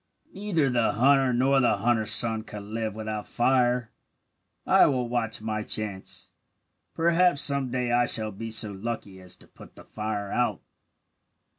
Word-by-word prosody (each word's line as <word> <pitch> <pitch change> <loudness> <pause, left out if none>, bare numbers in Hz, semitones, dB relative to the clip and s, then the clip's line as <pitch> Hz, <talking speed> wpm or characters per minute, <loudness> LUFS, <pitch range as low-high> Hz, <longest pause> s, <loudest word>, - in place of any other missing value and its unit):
"Neither 190 -7 -1
the 120 -2 0
hunter 135 +1 +3
nor 135 +3 +2
the 120 -5 +1
hunter's 110 +1 0
son 115 -2 +6
could 105 -2 -10
live, 110 0 -5
without 110 -1 -6
fire. 125 -1 0 0.7
I - - +4
will 125 -3 -1
watch 115 -2 -2
my 110 -1 -3
chance. 105 -3 -2 0.6
Perhaps 170 -2 +2
some 140 -3 +3
day 125 -1 -2
I 120 0 +2
shall 110 -2 +1
be 115 +3 -8
so 110 -1 +1
lucky 100 -2 -7
as 90 - -11
to - - -17
put - - -17
the - - -14
fire 105 -2 -5
out." 125 - -2
115 Hz, 155 wpm, -25 LUFS, 110-130 Hz, 0.7 s, son